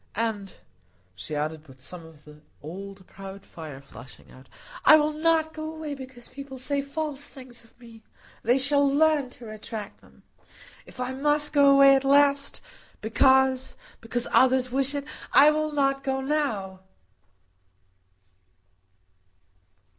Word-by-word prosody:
And," 210 -3 -3 0.6
she 95 +11 -7
added, 155 +1 -4
with 130 -1 -16
some 165 +6 -11
of 155 -2 -19
the 150 0 -15 0.2
old 190 +4 -9
proud 195 +1 -11
fire 150 -5 -10
flashing 130 -1 -15
out, 130 +1 -17 0.3
"I - - +8
will 305 0 +2
not 315 0 +1
go 310 0 -6
away 315 -2 -6
because 260 -3 -11
people 275 +1 -10
say 280 +2 0
false 285 0 -5
things 255 -4 -12
of 230 - -25
me. 230 -2 -15 0.4
They 245 +3 +2
shall 280 +2 +2
learn 290 -1 +2
to 250 -1 -13
retract 215 -1 -8
them. - - -22 0.6
If - - -15
I 250 +1 -3
must 295 +2 -1
go 285 -1 +5
away 275 0 +7
at 270 - 0
last, 280 0 +2 0.4
because—because 255 0 +1
others 260 -1 +3
wish 275 +2 +1
it, 285 0 -4 0.3
I 295 +2 +7
will 310 0 -1
not 275 -2 0
go 265 -1 -1
now." 265 -10 -2
260 Hz, 140 wpm, -25 LUFS, 200-285 Hz, 0.6 s, I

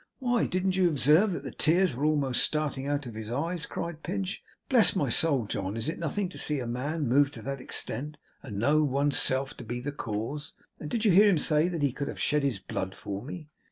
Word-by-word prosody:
'Why 245 -3 +1
didn't 185 +1 0
you 185 -2 +3
observe 155 +7 +4
that 155 -6 -4
the 135 - -6
tears 165 +1 +2
were 140 +4 -1
almost 145 -5 +2
starting 145 -3 -1
out 145 0 -1
of 120 - -7
his 110 0 -7
eyes!' 160 +6 -2
cried 170 -2 -5
Pinch. 190 +2 -4 0.2
'Bless 240 -6 +5
my 145 -8 0
soul, 140 -2 +2
John, 100 0 -3
is 115 - -2
it 160 - -3
nothing 180 +5 -2
to - - -6
see 150 - +2
a 130 - -3
man 140 +5 -2
moved 140 +3 +3
to - - -9
that 135 -1 -4
extent 145 +4 0 0.2
and 110 -8 -7
know 145 +8 +3
one's 140 -1 +1
self 130 +1 0
to - - -8
be 120 +1 -4
the 140 +4 -4
cause! 130 +3 -5 0.3
And 150 - -6
did 230 +4 -1
you 210 - +5
hear 205 +4 +7
him 185 - +3
say 155 +2 +4
that 170 -4 -3
he 140 - +2
could 140 +1 -4
have - - -6
shed 150 0 +1
his 135 -6 0
blood 95 0 -5
for 100 0 -6
me? 155 +4 -8
145 Hz, 235 wpm, -28 LUFS, 130-170 Hz, 0.3 s, hear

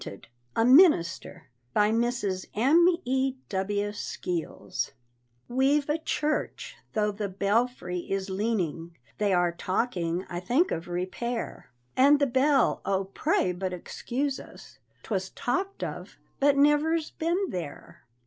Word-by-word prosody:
WANTED, 100 - -9 0.3
A 225 - +3
MINISTER. 255 - +4 0.3
BY 210 +1 +4
MRS. 225 -5 0
M.E.W. 260 - +1
SKEELS. 180 -4 -4 0.5
We've 275 +3 +2
a 305 +2 +1
church, 305 -1 -2 0.2
tho' 210 -1 +1
the 205 0 -4
belfry 200 -1 0
is 195 0 -1
leaning, 190 -5 -2 0.2
They 205 -1 +2
are 175 -1 +3
talking 180 -1 -1
I 175 - -4
think 250 - +1
of 165 +1 -3
repair, 185 - -4 0.3
And 280 +3 +6
the 285 - +3
bell, 270 +1 +2
oh, 195 0 -1
pray 180 - +1
but 185 +1 -3
excuse 260 +9 -3
us, - - -14 0.2
'Twas 190 -3 -2
talked 380 +11 -2
of, - - -6 0.2
but 280 0 +4
never's 300 +3 +3
been 350 +4 -1
there. 170 -5 -7
225 Hz, 120 wpm, -27 LUFS, 185-280 Hz, 0.5 s, And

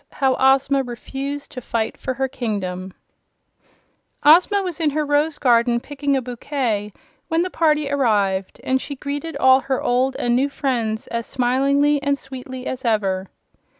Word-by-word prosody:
How 265 -1 +2
Ozma 270 +1 +4
Refused 270 +3 -6
to 255 - -7
Fight 225 -2 -2
for 260 - -4
Her 265 0 0
Kingdom 195 -8 -4 1.3
Ozma 360 +6 +5
was 355 -3 -4
in 320 -2 +2
her 300 +1 -1
rose 290 +1 +1
garden 235 -1 +3
picking 285 +1 -1
a 260 - -2
bouquet 240 -4 -2 0.4
when 325 0 +1
the 365 - -4
party 305 -3 +2
arrived, 205 -9 0
and 260 0 +1
she 285 - -6
greeted 290 +4 -5
all 260 0 +6
her 270 -1 -2
old 255 +2 +1
and 240 -2 0
new 270 +3 +2
friends 235 -6 -2
as 235 -1 -3
smilingly 275 +3 +2
and 280 0 +1
sweetly 260 -1 -8
as 260 +1 -4
ever. 195 -5 0
265 Hz, 155 wpm, -21 LUFS, 235-285 Hz, 1.3 s, all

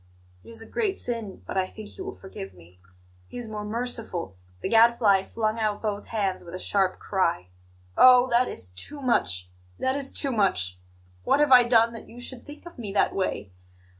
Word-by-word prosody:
It - - -15
is 225 -1 -7
a - - -13
great 405 - -1
sin; 230 -5 -5
but - - -5
I 185 - 0
think 215 +1 -10
He - - -11
will 390 +1 -6
forgive 95 - -10
me. 90 +1 -19 0.5
He - - -10
is 240 -2 -5
more 215 -1 -5
merciful 215 - -3
" 90 0 -30
The - - -2
Gadfly 225 -4 +4
flung 220 0 -2
out 215 -2 0
both 210 -1 -3
hands 200 -4 -2
with 170 +1 -9
a - - -6
sharp 190 -2 0
cry. 170 - -1 0.5
"Oh, 250 -1 +8
that 240 +2 +3
is 90 - -6
too 95 - -3
much! 90 - 0 0.3
That 260 +1 0
is 275 -1 -1
too 275 - +1
much! 95 - +1 0.4
What 280 - +2
have 295 -2 +3
I 250 -1 +10
done 230 -1 +4
that 230 - -10
you 240 - -12
should 245 0 -5
think 295 +3 -11
of 345 -6 -12
me 210 -4 -5
that 200 - +2
way? 100 - -3
215 Hz, 205 wpm, -26 LUFS, 185-245 Hz, 0.5 s, I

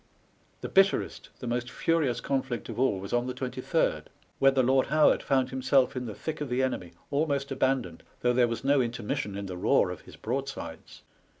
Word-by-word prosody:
The - - -4
bitterest, 195 0 +2
the - - -5
most 120 +1 -2
furious 145 -8 0
conflict 130 -4 -2
of - - -5
all, 125 -7 +2
was 100 +3 -7
on 120 +1 +1
the 125 - -4
23rd, 125 -2 -1 0.3
when 135 0 +5
the 130 - +4
Lord 130 +1 +3
Howard 155 +1 +4
found 130 -2 +1
himself 130 0 +2
in 125 -1 -3
the 110 - -6
thick 160 -1 -5
of 145 - -3
the 125 +1 +1
enemy, 90 -10 -3 0.2
almost 140 -1 0
abandoned, 130 -10 0 0.2
though 125 0 +3
there 120 -1 +4
was 115 +2 -4
no 140 0 +4
inter 120 -1 -3
mission 105 -1 -2
in 100 - -4
the 95 -2 -6
roar - - +3
of - - -7
his - - -14
broadsides. - - -5
130 Hz, 200 wpm, -28 LUFS, 120-135 Hz, 0.3 s, when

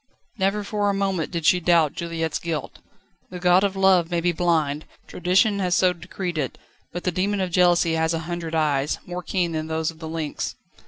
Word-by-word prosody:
Never 195 +2 +1
for 205 0 0
a 200 - 0
moment 195 -4 -1
did 170 -3 -4
she 180 +3 +5
doubt 165 -3 +3
Juliette's 165 -2 -3
guilt. 160 -4 -4 0.5
The 180 - -7
god 180 +1 +4
of 195 -1 0
love 190 -3 +4
may 175 -1 0
be 175 +1 +1
blind, 160 -4 0 0.2
tradition 195 +4 +2
has 180 -2 +1
so 180 -1 +4
decreed 175 -1 -5
it, 135 -4 -3 0.3
but 175 - -5
the 180 - 0
demon 195 +4 0
of 185 -2 -1
jealousy 175 -1 +3
has 160 0 +1
a - - -2
hundred 170 -1 -4
eyes, 150 -2 +1
more 180 0 -5
keen 180 -2 -1
than 155 -1 -3
those 160 0 -1
of 160 - -18
the 160 -1 -6
lynx. 160 -2 -4
175 Hz, 205 wpm, -23 LUFS, 160-185 Hz, 0.5 s, she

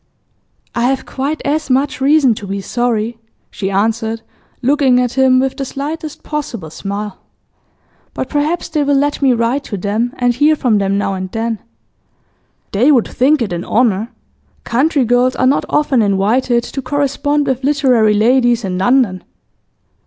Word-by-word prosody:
'I 235 0 0
have 265 +1 0
quite 280 +4 -3
as 300 0 -1
much 270 +1 0
reason 280 -2 +4
to 205 -2 -8
be 200 +1 -3
sorry,' 230 +1 -2 0.3
she 195 - -3
answered, 220 +3 -1 0.4
looking 265 -1 +3
at 245 -1 0
him 260 -1 +4
with 265 0 0
the 275 - -4
slightest 295 +3 -6
possible 235 - -5
smile. 200 +3 -5 1.0
'But - - -3
perhaps 305 +4 -1
they 310 -3 -1
will 285 0 +2
let 290 +1 0
me 270 -2 +4
write 235 +4 0
to 205 - -5
them, 215 +6 -2
and 245 -1 +2
hear 295 +5 +3
from 240 -8 +1
them 195 0 0
now 200 -1 -1
and 185 -1 -5
then.' 225 -1 -2 1.1
'They 245 +9 +3
would 250 -6 +3
think 270 +1 +2
it 195 -6 -4
an 175 0 -3
honour. 225 -1 +1 0.5
Country 275 +2 +1
girls 245 +2 +2
are 255 - +1
not 265 +2 +2
often 290 -5 +2
invited 220 +5 +1
to 270 - -5
correspond 285 +2 0
with 265 -1 -2
literary 255 -7 +3
ladies 240 +1 +3
in 180 -1 -3
London. 200 -3 +2
245 Hz, 160 wpm, -16 LUFS, 220-280 Hz, 1.1 s, reason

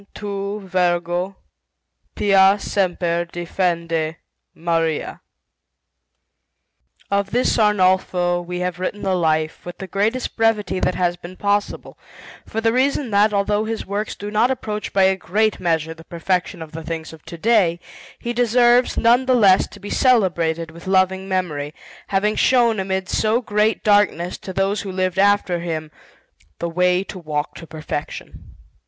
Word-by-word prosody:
TU. 200 0 -4
VIRGO. 180 0 -1 0.8
PIA. 195 -1 +5
SEMPER. 175 -4 0
DEFENDE. 170 -2 -2 0.4
MARIA. 165 -2 -1 1.9
Of 200 0 +1
this 245 +4 +1
Arnolfo 185 -4 +2
we 180 +1 -5
have 180 -1 -3
written 195 +3 -4
the 190 - +1
Life, 155 -3 0
with 175 - -8
the 195 - -6
greatest 210 +7 -1
brevity 225 -4 +1
that 180 - 0
has 175 -1 0
been 175 +1 -11
possible, 205 0 -2 0.5
for 220 - -3
the 225 0 +1
reason 265 -1 +1
that, 205 +1 +4
although 205 +1 0
his 225 0 -4
works 205 +2 -3
do 205 +1 -7
not 215 +4 +3
approach 215 -5 -3
by 195 - +3
a 190 0 +4
great 215 +3 0
measure 160 -3 0
the 165 0 -15
perfection 175 +1 -2
of 155 - -12
the 165 - -7
things 160 0 -5
of 160 - -14
to 170 - -8
day, 185 -4 +2 0.4
he 240 - -4
deserves, 245 +1 +3
none 245 +3 +3
the 255 - +4
less, 195 -5 +5
to 205 - -14
be 205 +1 -8
celebrated 170 -9 +2
with 170 +3 -13
loving 190 0 +1
memory, 155 -6 -2 0.3
having 210 +2 +1
shown 235 -4 +3
amid 190 0 -2
so 220 +5 +1
great 215 -2 0
darkness, 205 -4 +2
to 190 - -7
those 195 +2 0
who 195 - -6
lived 185 0 -1
after 200 -3 +3
him, 160 -2 -4 0.7
the 170 - -3
way 180 +2 +2
to 195 - -9
walk 150 -3 -3
to 165 - -11
perfection. 155 -2 -7
190 Hz, 150 wpm, -21 LUFS, 175-210 Hz, 1.9 s, PIA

